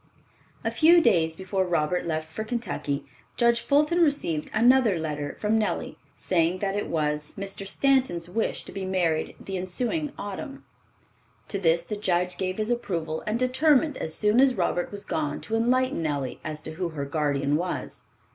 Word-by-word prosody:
A 225 - 0
few 325 +9 +6
days 170 - +3
before 190 +2 -1
Robert 175 0 0
left 155 -1 -2
for 160 +7 -5
Kentucky 215 - -3 0.3
Judge 235 -1 +3
Fulton 300 +6 +3
received 285 - +1
another 240 -3 +4
letter 150 -2 -4
from 220 +1 +2
Nellie, 215 - -2 0.2
saying 175 0 +1
that 195 +1 -2
it 205 - -2
was 150 -1 -1
Mr. 195 0 -4
Stanton's 255 -9 +2
wish 220 +5 -2
to - - -8
be 195 - -5
married 180 -4 0
the 195 -1 -5
ensuing 250 - -2
autumn. 270 +8 -7 0.8
To 200 - -2
this 170 -2 +3
the 210 +4 -5
judge 180 -3 0
gave 185 0 -2
his 215 +2 -1
approval 165 -9 -2
and 215 +2 +1
determined 265 +4 +3
as 160 -8 -4
soon 210 +3 +3
as 265 -1 +5
Robert 175 -2 -1
was 205 0 -6
gone 150 -2 -2
to 225 - -3
enlighten 250 -2 +2
Nellie 145 -5 -2
as 155 -1 -5
to 155 - -6
who 175 +2 -3
her 145 -3 -4
guardian 145 -1 0
was. 155 -6 -4
190 Hz, 170 wpm, -26 LUFS, 160-235 Hz, 0.8 s, few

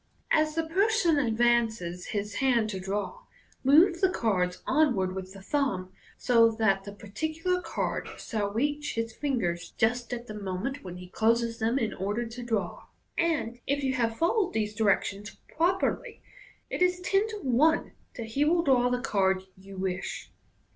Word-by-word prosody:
As 310 0 +3
the 325 0 0
person 375 -2 +2
advances 225 -7 +1
his 205 0 -3
hand 235 -5 +2
to 190 - -4
draw, 200 - -3 0.4
move 335 +6 +5
the 380 - +5
cards 185 - 0
onward 250 -11 +2
with 190 0 -6
the 195 -1 -12
thumb, 220 -10 -1 0.3
so 230 -2 +5
that 220 -4 +1
the 200 - -6
particular 315 - -2
card 330 - -3
s'lall 205 -2 -3
reach 290 +7 -1
his 230 0 -2
fingers 190 -13 -2
just 235 +1 +1
at 240 -1 -4
the 215 - -8
moment 205 +6 -4
when 180 -2 -7
he 180 0 -10
closes 230 +4 +1
them 230 +3 +1
in 225 -5 -1
order 205 +5 -2
to 230 +2 -8
draw 220 -7 -2
$ - - -19 0.3
and, 290 -9 0
if 280 +1 0
you 265 -1 +1
have 230 -3 0
followed 365 +3 +1
these 215 -1 -1
directions 205 -1 0 0.2
properly, 360 +4 0 0.5
it - - -3
is 360 0 +3
ten 390 +3 +2
to 440 - -6
one 290 +6 +3 0.2
that 230 - -5
he 275 +6 +1
will 335 +3 +3
draw 250 -4 +3
the 250 0 -1
card 190 -4 +1
you 195 +1 -12
wish. 185 -1 -4
230 Hz, 170 wpm, -28 LUFS, 200-295 Hz, 0.5 s, move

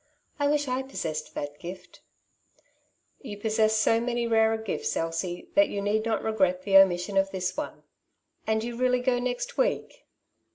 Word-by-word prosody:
I 285 - +2
wish 290 0 +1
I 255 +1 -1
possessed 165 - -5
that 145 0 -5
gift/' 180 +2 -9 1.2
'^Tou 205 -6 -7
possess 220 0 +2
so 225 +1 +3
many 240 0 -1
rarer 225 -1 +3
gifts, 220 -2 -3
Elsie, 165 +2 -3
that 300 0 +4
you 200 - -3
need 210 +2 0
not 225 - 0
regret 190 -4 +1
the 195 -1 +5
omission 190 0 +4
of 195 0 +3
this 185 -1 -3
one. - - -6 0.6
And 220 0 +1
you 240 0 -4
really 250 0 +1
go 250 -1 +1
next 250 - -3
week - - -1
220 Hz, 165 wpm, -27 LUFS, 195-245 Hz, 1.2 s, the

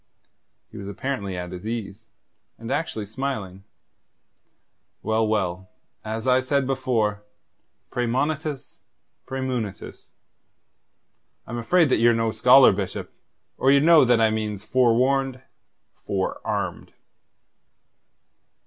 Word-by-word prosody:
He - - -11
was 100 - -7
apparently 100 -3 -4
at 90 0 -6
his 90 +3 -7
ease, 110 -1 -6 0.5
and 115 +2 -7
actually 135 -8 -2
smiling. 105 -5 -5 1.4
"Well, 110 +1 +1
well 95 -4 -2 0.3
as 110 +2 -4
I 130 0 +5
said 135 +1 0
before 115 -6 -1 0.7
praemonitus, 140 +4 -2 0.5
praemunitus. 130 -6 -5 1.4
I'm 120 - -5
afraid 165 +6 +3
that - - +3
ye're 120 0 +4
no 115 -1 0
scholar, 130 +3 +7
Bishop, - - -5 0.5
or 135 - +3
ye'd 140 +1 +5
know 165 -2 +7
that 120 -2 +3
I 110 -1 +3
means 105 -2 -3
forewarned, 130 +2 +1 0.6
forearmed." 95 -1 -3
115 Hz, 105 wpm, -24 LUFS, 105-130 Hz, 1.4 s, scholar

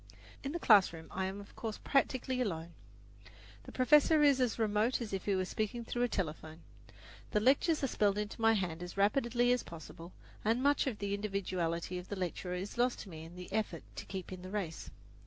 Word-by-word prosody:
In 275 - -3
the 340 - -2
classroom 190 - +4
I 190 0 -1
am 190 +2 -4
of 200 - -12
course 220 -2 -4
practically 260 -2 +1
alone. 170 -7 -3 0.9
The - - -9
professor 300 +4 +5
is 280 -3 +5
as 245 -3 +1
remote 220 +2 +1
as 225 -4 -5
if 190 - -3
he 200 - +2
were 185 0 0
speaking 220 +4 -3
through 240 - -2
a 245 - +3
telephone. 160 -5 -4 0.7
The 210 - +2
lectures 280 +7 +3
are - - +3
spelled 205 -4 +2
into 210 +2 -4
my 225 0 +5
hand 180 -5 -2
as 180 +2 -7
rapidly 240 +4 +3
as 250 - +2
possible, 165 +1 -10 0.3
and 230 +4 +1
much 285 0 +3
of 240 -5 -2
the 200 -1 -2
individuality 185 -4 -2
of 180 - -10
the 205 - -4
lecturer 180 -1 -3
is 195 +6 -5
lost 245 0 +2
to 200 - -10
me 160 -2 -8
in 165 +2 -11
the 180 +1 -9
effort 220 -1 -1
to - - -5
keep 190 -2 -6
in 185 - -8
the 185 - -8
race. 190 -5 -4
205 Hz, 210 wpm, -33 LUFS, 180-245 Hz, 0.9 s, professor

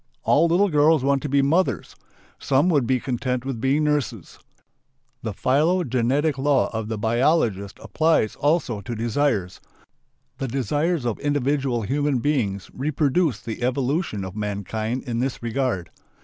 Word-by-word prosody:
All 165 +3 +4
little 185 +5 +3
girls 150 -2 +4
want 140 0 +2
to 150 - -4
be 140 0 +3
"mothers"; 165 +7 0 0.4
some 140 +6 +2
would 145 -8 +2
be 130 -1 +2
content 125 0 -2
with 130 -5 -4
being 140 +4 +2
"nurses." 130 - -2 0.8
The 110 - -3
phylogenetic 140 - +1
law 135 -4 +1
of 110 -1 -3
the 110 0 -3
biologist 115 - +1
applies 160 -9 +1
also 145 -8 0
to 115 +4 -5
desires. 115 -4 -1 0.8
The 135 - -2
desires 145 - -1
of 120 -3 -2
individual 140 -4 0
human 145 +4 0
beings 115 -8 -1
reproduce 145 - 0
the 115 0 -6
evolution 125 - -1
of 95 0 -8
mankind 110 +3 -3
in 120 -3 -3
this 130 -1 -3
regard. 115 -7 -2
130 Hz, 140 wpm, -23 LUFS, 115-145 Hz, 0.8 s, All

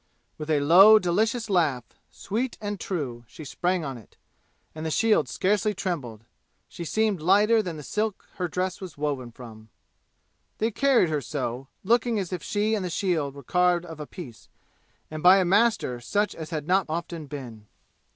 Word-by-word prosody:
With 155 0 -6
a 150 -2 +2
low 190 +9 +8
delicious 220 +5 0
laugh, 160 - +1 0.3
sweet 235 +5 -4
and 205 -2 -4
true, 135 -10 -4
she 150 +6 -11
sprang 180 +3 -1
on 135 -3 -5
it, 110 - -20 0.6
and 155 - -7
the 160 - -2
shield 220 +7 +2
scarcely 210 +2 0
trembled; 135 - -4 0.4
she 170 - -8
seemed 210 0 0
lighter 205 +6 +4
than 175 -6 -5
the 150 - -8
silk 210 +5 -3
her 180 - -1
dress 185 +2 -3
was 185 -6 -8
woven 140 -5 -3
from! 110 -3 -12 0.9
They 225 +2 0
carried 260 - +3
her 150 -2 -1
so, 130 -1 -4 0.2
looking 235 +2 +2
as 190 -3 -3
if 180 - -3
she 210 +5 -1
and 210 -3 0
the 180 - -3
shield 160 -6 -1
were 140 - -10
carved 180 +3 +2
of 160 -3 -10
a 150 - -6
piece, 130 -11 -11 0.6
and 155 0 -5
by 185 +3 +7
a 190 - +2
master 200 - +2
such 205 - 0
as 160 -1 -8
has 155 -3 -3
not 185 +3 +1
often 165 -1 -4
been. 120 -7 -9
175 Hz, 180 wpm, -26 LUFS, 145-205 Hz, 0.9 s, low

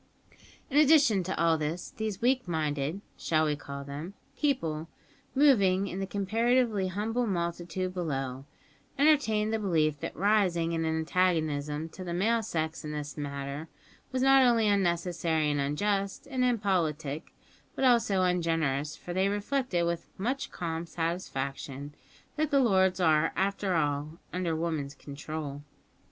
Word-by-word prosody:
In 280 - +1
addition 290 -9 +5
to 190 - -3
all 165 -1 +3
this, 155 +4 -3
these 220 -2 -3
weak 255 -2 +2
minded 155 +1 -1 0.2
(shall 155 -1 +2
we 150 -1 +1
call 140 -1 -7
them?) 145 +7 -7 0.2
people, 165 - -1 0.5
moving 200 -10 +4
in 190 -1 -5
the 195 - -2
comparatively 220 +1 +1
humble 225 +6 -1
multitude 175 0 -2
below, 135 -7 -3 0.5
entertained 225 -8 +3
the 220 - +1
belief 155 -7 +1
that - - -5
rising 185 -4 +2
in 165 -1 -1
antagonism 160 -2 0
to 185 - -9
the 170 -1 -4
male 225 +5 +2
sex 160 -6 -3
in 150 - -5
this 145 -1 -5
matter 140 +1 -5 0.4
was 255 0 0
not 270 0 +7
only 235 -4 +4
unnecessary 170 -5 +1
and 145 -1 0
unjust 195 - -1
and 255 -1 +1
impolitic, 170 - 0 0.4
but 270 - +1
also 230 -6 +4
ungenerous, 165 -5 0
for 175 - -7
they 190 +2 +2
reflected 205 -3 0
with 170 0 -3
much 255 +8 -2
calm 165 -1 -4
satisfaction 145 -4 -4 0.4
that 310 0 +1
the 280 -2 +4
"lords" 190 -6 +3
are, 160 -2 +3
after 195 -1 0
all, 150 0 -1 0.2
"under 175 -3 -1
woman's 155 -4 -2
control." 145 0 -6
175 Hz, 140 wpm, -29 LUFS, 155-205 Hz, 0.5 s, not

